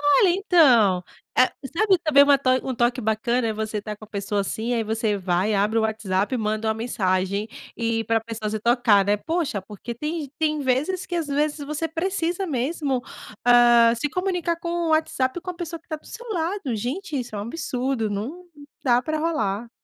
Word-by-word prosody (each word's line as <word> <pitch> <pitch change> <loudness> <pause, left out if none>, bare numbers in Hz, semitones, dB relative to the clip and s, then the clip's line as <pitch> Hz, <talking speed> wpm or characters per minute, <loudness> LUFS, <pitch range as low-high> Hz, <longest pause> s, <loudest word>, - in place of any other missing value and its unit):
Olha 290 +6 +5
então, 265 - +4 0.3
eh, 255 - +5 0.3
sabe, 390 -3 +4
saber 280 -2 +7
uma 285 0 +5
to 265 -1 +1
um 260 - -2
toque 240 +1 +1
bacana, 225 +2 0
e - - 0
você 215 0 -3
tá 210 0 -6
com 215 - -12
a - - -19
pessoa 200 -1 -2
assim, 225 +5 -2
aí 230 - +1
você 220 -1 0
vai, 190 +2 0
abre 210 +3 +2
o - - +2
WhatsApp, 215 0 -1
e - - 0
manda 215 0 -1
uma 220 - +1
mensagem, 200 -2 -1 0.3
e 230 -1 -1
para 225 +1 +1
pessoa 225 -1 -5
você 215 - -2
se - - -5
tocar, 235 -5 +4
né. 205 +1 +2
Poxa, 295 - -2
porque 210 +4 -8
tem 305 +6 -3
g 275 - -12
tem 305 -1 0
vezes 285 +8 0
que 355 - -5
às 335 -3 -1
vezes 295 +2 0
você 305 +2 -2
precisa 350 +2 -2
mesmo, 275 -2 -1 0.4
ah, 240 -1 +6
se 295 +6 -1
comunicar 360 -2 -1
com 340 - -5
o 345 -1 -1
WhatsApp 315 -1 +1
com 365 - -5
a 360 - -6
pessoa 335 -1 -6
que - - -40
tá 310 - -3
do 305 - -19
seu 480 - -10
lado. 340 - -2
Gente, 290 - -3
isso 240 -4 -6
é - - -3
um - - -3
absurdo, 250 -2 -2
não 250 - -5 0.4
dá 245 -1 +4
para 310 +2 -2
rolar. 235 -9 -1
245 Hz, 210 wpm, -24 LUFS, 220-315 Hz, 0.4 s, saber